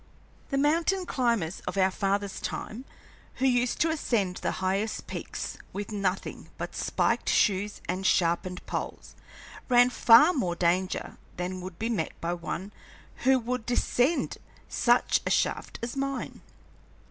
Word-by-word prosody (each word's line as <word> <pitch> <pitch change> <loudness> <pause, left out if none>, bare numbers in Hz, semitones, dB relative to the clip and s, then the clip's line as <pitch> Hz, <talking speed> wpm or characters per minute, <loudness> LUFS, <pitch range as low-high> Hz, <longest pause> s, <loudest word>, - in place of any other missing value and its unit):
The 275 - 0
mountain 335 +6 +2
climbers 235 - 0
of - - -3
our 190 0 +4
fathers' 200 +1 -1
time, 240 +5 -5 0.5
who 260 - 0
used 245 -1 +2
to 325 +1 +3
ascend 210 - 0
the - - -2
highest 195 +4 -1
peaks - - -5
with 205 +2 -5
nothing 195 -2 -2
but - - -5
spiked - - 0
shoes 205 0 +2
and 185 +2 -2
sharpened 180 0 +1
poles, - - -5 0.6
ran 245 0 +6
far 245 +9 +7
more 180 - -1
danger 180 +2 0 0.2
than 180 +1 -3
would 180 -1 -8
be 225 - -2
met 205 -9 -2
by 170 +1 -1
one 175 +3 -5 0.5
who 265 0 +6
would 245 -1 -3
descend 245 +5 +1 0.3
such 240 0 +3
a - - +1
shaft - - 0
as 235 +2 -3
mine. 275 0 -3
210 Hz, 140 wpm, -28 LUFS, 185-250 Hz, 0.6 s, far